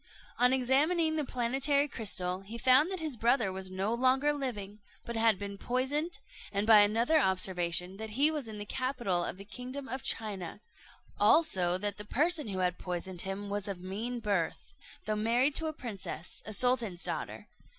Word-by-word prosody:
On 250 Hz, +1 st, +5 dB
examining 300 Hz, +6 st, +2 dB
the 305 Hz, -, 0 dB
planetary 270 Hz, +3 st, +2 dB
crystal, 185 Hz, -7 st, -1 dB
he 210 Hz, +4 st, -8 dB
found 260 Hz, +6 st, +5 dB
that 380 Hz, -1 st, -3 dB
his 310 Hz, -5 st, -1 dB
brother 230 Hz, -3 st, +2 dB
was 190 Hz, 0 st, -4 dB
no 190 Hz, +4 st, -2 dB
longer 260 Hz, +4 st, +2 dB
living, 215 Hz, -8 st, -5 dB, 0.3 s
but 235 Hz, -, -5 dB
had 225 Hz, -2 st, +3 dB
been 200 Hz, 0 st, -7 dB
poisoned; 285 Hz, +7 st, -1 dB, 0.3 s
and 200 Hz, +1 st, -1 dB
by 220 Hz, -1 st, +8 dB
another 230 Hz, +9 st, +4 dB
observation, 180 Hz, -, 0 dB
that 220 Hz, +1 st, -6 dB
he 295 Hz, +3 st, +5 dB
was 295 Hz, -6 st, -4 dB
in 215 Hz, -1 st, -7 dB
the 205 Hz, -, -5 dB
capital 240 Hz, -8 st, -1 dB
of 175 Hz, -, -4 dB
the 195 Hz, -, -10 dB
kingdom 255 Hz, +5 st, -7 dB
of 260 Hz, 0 st, -4 dB
China; 205 Hz, -7 st, -3 dB, 0.6 s
also, 185 Hz, -, +4 dB
that 205 Hz, +1 st, -3 dB
the 210 Hz, -, -6 dB
person 305 Hz, +5 st, +1 dB
who 195 Hz, -2 st, -4 dB
had 180 Hz, -1 st, -2 dB
poisoned 180 Hz, 0 st, -4 dB
him 195 Hz, +1 st, -4 dB
was 205 Hz, 0 st, -3 dB
of 195 Hz, -3 st, -4 dB
mean 215 Hz, +7 st, -4 dB
birth, 200 Hz, -7 st, -2 dB, 0.3 s
though 215 Hz, 0 st, 0 dB
married 235 Hz, +6 st, +2 dB
to 320 Hz, +3 st, 0 dB
a -, -, -1 dB
princess, 210 Hz, -, -6 dB
a -, -, -4 dB
sultan's 230 Hz, -7 st, +2 dB
daughter. -, -, -4 dB
225 Hz, 180 wpm, -31 LUFS, 195-265 Hz, 0.6 s, by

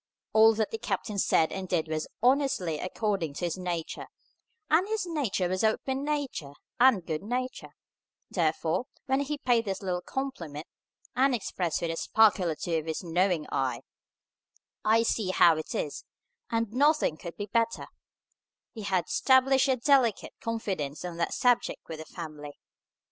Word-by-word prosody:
All 220 Hz, 0 st, +7 dB
that 215 Hz, -1 st, -1 dB
the 225 Hz, -, -4 dB
captain 205 Hz, -2 st, -3 dB
said 160 Hz, -3 st, +3 dB
and 190 Hz, -1 st, -5 dB
did 160 Hz, -3 st, 0 dB
was 155 Hz, 0 st, -2 dB, 0.2 s
honestly 250 Hz, -, +2 dB
according 185 Hz, -5 st, -2 dB
to 175 Hz, -, -2 dB
his 170 Hz, -, -1 dB
nature; 175 Hz, -3 st, -4 dB, 0.6 s
and 340 Hz, +5 st, +3 dB
his 430 Hz, -2 st, -1 dB
nature 275 Hz, -, -1 dB
was 185 Hz, +3 st, -1 dB
open 265 Hz, +5 st, 0 dB
nature 285 Hz, -, -3 dB, 0.3 s
and 240 Hz, -8 st, +5 dB
good 155 Hz, -2 st, -3 dB
nature; 250 Hz, +4 st, -4 dB, 0.6 s
therefore, 165 Hz, -, 0 dB, 0.2 s
when 265 Hz, +1 st, +1 dB
he 285 Hz, +1 st, -2 dB
paid 240 Hz, -4 st, +2 dB
this 195 Hz, 0 st, -3 dB
little 180 Hz, -2 st, -1 dB
compliment, 175 Hz, -, -5 dB, 0.5 s
and 260 Hz, 0 st, +3 dB
expressed 180 Hz, -6 st, -2 dB
with 165 Hz, -, 0 dB
a 165 Hz, -, -4 dB
sparkle 210 Hz, -4 st, +3 dB
or 160 Hz, -, -1 dB
two 165 Hz, +1 st, -2 dB
of 155 Hz, -, -9 dB
his 160 Hz, +3 st, -3 dB
knowing 175 Hz, -1 st, +1 dB
eye, 130 Hz, -3 st, -1 dB, 1.0 s
"I 225 Hz, +1 st, +4 dB
see 220 Hz, -4 st, 0 dB
how 175 Hz, -2 st, +6 dB
it 155 Hz, -, -5 dB
is, 145 Hz, -, -3 dB, 0.5 s
and 230 Hz, -2 st, -1 dB
nothing 290 Hz, -, +3 dB
could 170 Hz, +1 st, -9 dB
be 205 Hz, -, -3 dB
better," 230 Hz, +2 st, 0 dB, 0.9 s
he 225 Hz, -, -7 dB
had 190 Hz, -4 st, 0 dB
established 265 Hz, +1 st, +4 dB
a 265 Hz, -, +3 dB
delicate 255 Hz, -3 st, +2 dB
confidence 190 Hz, -10 st, -3 dB
on 175 Hz, -2 st, -6 dB
that 170 Hz, -, -1 dB
subject 245 Hz, -1 st, +1 dB
with 160 Hz, -1 st, -7 dB
the 160 Hz, -, -7 dB
family. 150 Hz, -4 st, -8 dB
200 Hz, 160 wpm, -28 LUFS, 165-250 Hz, 1.0 s, All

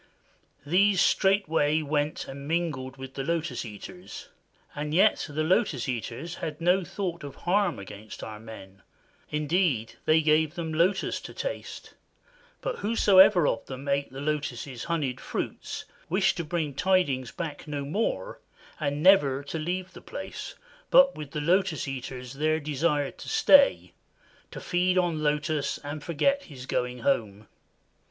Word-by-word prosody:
These 190 Hz, +5 st, +3 dB
straightway 165 Hz, -7 st, +3 dB
went 150 Hz, 0 st, -1 dB
and 140 Hz, +1 st, -8 dB
mingled 150 Hz, -6 st, -2 dB
with 130 Hz, 0 st, -8 dB
the 135 Hz, -, -4 dB
Lotus 165 Hz, +2 st, -2 dB
Eaters, 100 Hz, -2 st, -9 dB, 0.4 s
and 150 Hz, +1 st, -3 dB
yet 205 Hz, +4 st, +4 dB
the 155 Hz, +1 st, -1 dB
Lotus 170 Hz, -, +1 dB
Eaters 125 Hz, +6 st, -4 dB
had 150 Hz, -1 st, -4 dB
no 180 Hz, +3 st, +3 dB
thought 175 Hz, -3 st, -4 dB
of 140 Hz, -2 st, -8 dB
harm 180 Hz, -, +2 dB
against 105 Hz, +2 st, -9 dB
our 105 Hz, -1 st, -7 dB
men; 100 Hz, -3 st, -12 dB, 0.5 s
indeed, 150 Hz, -, 0 dB
they 155 Hz, +1 st, +5 dB
gave 155 Hz, +1 st, +3 dB
them 165 Hz, -3 st, -4 dB
lotus 180 Hz, +5 st, +1 dB
to -, -, -10 dB
taste; -, -, -6 dB, 0.7 s
but -, -, -3 dB
whosoever 195 Hz, -5 st, +6 dB
of -, -, 0 dB
them 135 Hz, +1 st, -7 dB
ate 140 Hz, -1 st, 0 dB
the 135 Hz, +1 st, -7 dB
lotus' 140 Hz, -4 st, -3 dB
honeyed 145 Hz, -7 st, -1 dB
fruit -, -, -5 dB, 0.2 s
wished 190 Hz, +3 st, +2 dB
to 170 Hz, -, -2 dB
bring 155 Hz, -2 st, -2 dB
tidings 145 Hz, -7 st, +1 dB
back 155 Hz, -4 st, -6 dB
no 145 Hz, -2 st, -3 dB
more 225 Hz, -, -2 dB, 0.4 s
and 145 Hz, -1 st, -2 dB
never 145 Hz, -8 st, +5 dB
to 160 Hz, +3 st, -5 dB
leave 180 Hz, +4 st, -3 dB
the -, -, -11 dB
place, -, -, -7 dB, 0.3 s
but 275 Hz, 0 st, +7 dB
with 150 Hz, -2 st, -8 dB
the 150 Hz, +1 st, -4 dB
Lotus 180 Hz, 0 st, +1 dB
Eaters 125 Hz, -1 st, -6 dB
there 155 Hz, +3 st, +1 dB
desired 145 Hz, -1 st, -1 dB
to -, -, -7 dB
stay, 290 Hz, -11 st, +5 dB, 0.6 s
to -, -, -8 dB
feed 180 Hz, +1 st, +1 dB
on 170 Hz, -4 st, +1 dB
lotus 150 Hz, -1 st, 0 dB
and 145 Hz, +1 st, -6 dB
forget 275 Hz, -, +1 dB
his 130 Hz, -4 st, -10 dB
going 125 Hz, -1 st, -2 dB
home. 105 Hz, -2 st, -1 dB
155 Hz, 145 wpm, -27 LUFS, 135-180 Hz, 0.7 s, but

